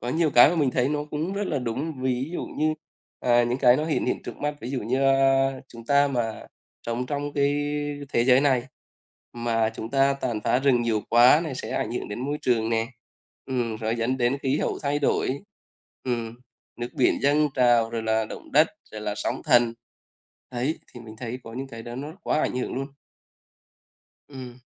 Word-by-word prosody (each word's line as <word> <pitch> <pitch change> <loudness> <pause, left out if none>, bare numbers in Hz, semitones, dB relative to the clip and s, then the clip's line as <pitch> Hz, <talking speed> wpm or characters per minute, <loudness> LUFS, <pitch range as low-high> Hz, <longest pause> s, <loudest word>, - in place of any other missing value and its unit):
có 120 - -5
nhiều 155 +3 +1
cái 120 +1 +8
mà 175 - -2
mình 145 -5 +2
thấy 125 +1 +1
nó 150 0 -1
cũng 155 +5 -2
rất 200 0 -2
là 150 - -1
đúng, 130 +4 -4
ví 130 +2 -1
dụ - - -3
như, 155 0 -1 0.5
à, 120 -1 +4
những 120 +2 -1
cái 125 -2 +6
nó 155 - -1
hiển 160 - -1
hiện - - -1
trước - - -7
mắt, 150 0 -2
ví 120 - -6
dụ 135 -2 -2
như, 130 +5 0
a, 135 0 +4 0.2
chúng 115 -1 -12
ta 140 +2 +4
mà 120 -5 -3 0.4
sống 120 +2 -2
trong 145 +1 -3
cái 140 0 +2 0.6
thế 115 - +3
giới 130 0 +6
này 130 -4 +2 0.7
mà 115 -2 0
chúng 110 - -6
ta 135 0 +3
tàn 120 -5 -3
phá 120 +1 +3
rừng 130 -3 +3
nhiều 115 -2 0
quá 120 +6 +6
này 150 -5 -4
sẽ - - -6
ảnh - - -2
hưởng - - -4
đến 105 +3 -5
môi 145 +3 -2
trường 115 -3 +1
nè. 115 0 0 0.6
Ừm, 120 -4 -2
rồi 110 +1 -2
dẫn 120 +3 0
đến 125 +2 +1
khí 135 +2 +1
hậu - - -1
thay 145 0 0
đổi, 140 -1 0 0.7
ừm, 115 -3 -2 0.5
nước 120 - -2
biển 125 - +2
dâng 150 +2 +3
trào 120 -3 +4
rồi 115 -1 -3
là 110 0 +1
động - - -10
đất, 155 +3 +6 0.2
rồi 110 - -6
là 105 -1 -3
sóng 105 - -3
thần. 120 -5 +4 0.8
Đấy, 130 +6 -1 0.2
thì 120 - -9
mình 110 -2 -11
thấy 125 +1 -5
có 115 - -9
những 135 +2 -5
cái 115 -2 -9
đó 120 +1 -7
nó 145 +4 -6
quá - - +1
ảnh - - -1
hưởng 125 - -3
luôn. 135 +1 -3 1.4
Ừm. 130 -3 -9
125 Hz, 210 wpm, -25 LUFS, 120-140 Hz, 1.4 s, cái